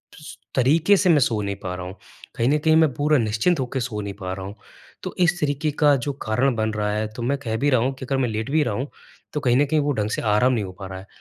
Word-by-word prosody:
सु 150 - -11 0.2
तरीके 160 +10 +4
से 185 -1 +2
मैं 155 - +6
सो 115 -4 +1
नहीं 100 -1 -3
पा 90 -2 -3
रहा 90 -1 -6
हूँ, 95 +2 -8 0.4
कहीं 115 +2 +1
न 150 - +3
कहीं 160 +1 +3
मैं 160 -3 +4
पूरा 150 +1 +2
निश्चिंत 115 +9 +1
होके 130 +1 -3
सो 115 -3 -3
नहीं 100 -1 -5
पा 90 0 -4
रहा 95 0 -6
हूँ। 100 - -8 0.5
तो - - -5
इस 175 0 +2
तरीके 150 +1 0
का 145 -1 +6
जो 140 +3 -3
कारण 125 +4 +1
बन 110 -1 0
रहा 105 -1 -1
है, 105 +1 -1
तो 110 +3 -9
मैं 140 +3 0
कह 110 -4 -3
भी 145 +4 +1
रहा 125 -3 +3
हूँ 135 +2 0
कि 130 - -8
अगर 135 +1 -1
मैं 125 -3 0
लेट 110 +4 -3
भी 155 0 +3
रहा 120 -6 -2
हूँ, 130 +6 -3 0.5
तो 150 - -1
कहीं 125 -2 +3
न 145 - +4
कहीं 155 +2 +1
वो 145 0 0
ढंग 105 -3 -1
से - - -2
आराम 110 +4 +3
नहीं 110 - 0
हो 95 - -7
पा 95 - -6
रहा 95 0 -7
है, 95 - -13
125 Hz, 300 wpm, -23 LUFS, 105-145 Hz, 0.5 s, मैं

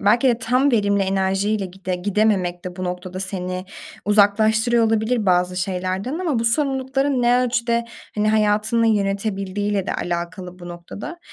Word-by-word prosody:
belki 235 +6 +4
de 235 - +2
tam 250 +5 +2
verimli 200 -4 +2
enerjiyle 195 +2 0
gide 185 0 -5
gidememek 185 -2 0
de 180 -1 -6
bu 185 - -4
noktada 180 +1 -5
seni 185 -1 -4 0.4
uzaklaştırıyor 220 +3 +3
olabilir 220 0 0
bazı 180 0 +2
şeylerden 185 - -2
ama 325 -9 0
bu 230 - -1
sorumlulukların 270 +1 +1
ne 245 +1 +4
ölçüde, 235 -1 0 0.3
hani, 210 0 +1
hayatını 215 +2 +2
yönetebildiğiyle 200 -1 -1
de - - -2
alakalı 175 +1 -4
bu 175 -1 -9
noktada. 175 - -8
205 Hz, 145 wpm, -21 LUFS, 185-230 Hz, 0.4 s, belki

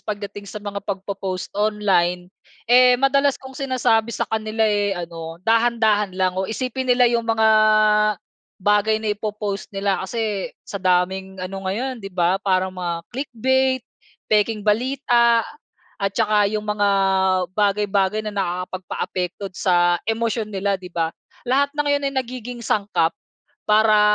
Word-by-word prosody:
pagdating 205 -1 -6
sa 205 +1 -8
mga 200 -1 -4
pagpo-post 195 -1 -4
online 190 -4 +1 0.4
eh, 250 0 +7
madalas 275 0 +3
kong 265 0 -10
sinasabi 250 -5 +1
sa - - -1
kanila, 220 0 -3
eh, 205 -2 +1
ano, 165 -1 -7
dahan-dahan 225 -3 +2
lang 185 -1 +1
o 190 - 0
isipin 255 +3 -3
nila 245 0 +5
yung 235 -1 0
mga, 220 -1 +3 1.1
bagay 210 +2 +2
na 215 -1 0
ipo-post 210 -1 -4
nila 195 0 -1
kasi, 215 -2 -2 0.2
sa 200 - -4
daming 190 +1 0
ano 195 +1 -6
ngayon 245 +6 -2
'di 195 - -7
ba? 180 +1 +2
Parang 185 -1 +1
mga 170 -2 -3
click 270 +3 -5
bait, 260 +1 +2 0.4
pekeng 215 0 +1
balita 235 0 +2 0.5
at 200 -1 0
'tsaka 210 -2 +2
yung 215 0 -3
mga, 205 -1 +1 0.7
bagay-bagay 205 0 +1
na 210 - -4
nakakapagpaapekto 185 0 -4
sa 175 -2 +2
emosyon 225 -1 -1
nila 200 0 -1
'di 185 -2 -8
ba? 165 -1 -2 0.3
Lahat 280 +3 +2
ng 295 0 -1
yon 285 -1 +1
ay - - -12
nagiging 245 -1 -6
sangkap 185 -6 +1 0.5
para, 215 0 +5
210 Hz, 140 wpm, -21 LUFS, 190-230 Hz, 1.1 s, eh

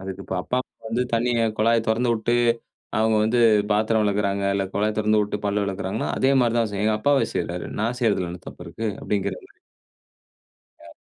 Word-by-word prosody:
அதுக்கு 95 0 -7
இப்ப 95 - -4
அப்பா, 125 - -1
அம்மா - - -30
வந்து 120 +3 0
தண்ணிய 120 +1 +1 0.2
குழாய 115 +1 +4
தொறந்து 120 +2 +2
விட்டு 120 +2 0 0.6
அவங்க 110 0 +3
வந்து 120 +3 +1 0.3
பாத்திரம் 110 +1 +2
வெளக்கிறாங்க 100 -1 0
இல்ல 100 -1 0
கொழாய 105 +1 +1
தெறந்து 110 0 +3
விட்டு 105 - -3
பல் 100 +1 0
வெளக்கிறாங்கன்னா, 100 +2 -3
அதே 135 - +3
மாரி 120 -1 +1
தா 115 - +3
செய்யு. 100 +2 -1
ஏ 110 - +2
அப்பாவே 145 +3 +2
செய்றாரு. 85 +1 -3
நா 110 - +1
செய்றதில 100 -7 +1
என்ன 90 - -9
தப்பு - - -11
இருக்கு? 115 - -5
அப்படிங்கிற 100 -2 -1
மாரி. 395 -2 -28 1.3
ஆ. - - -13
110 Hz, 185 wpm, -23 LUFS, 100-115 Hz, 1.3 s, குழாய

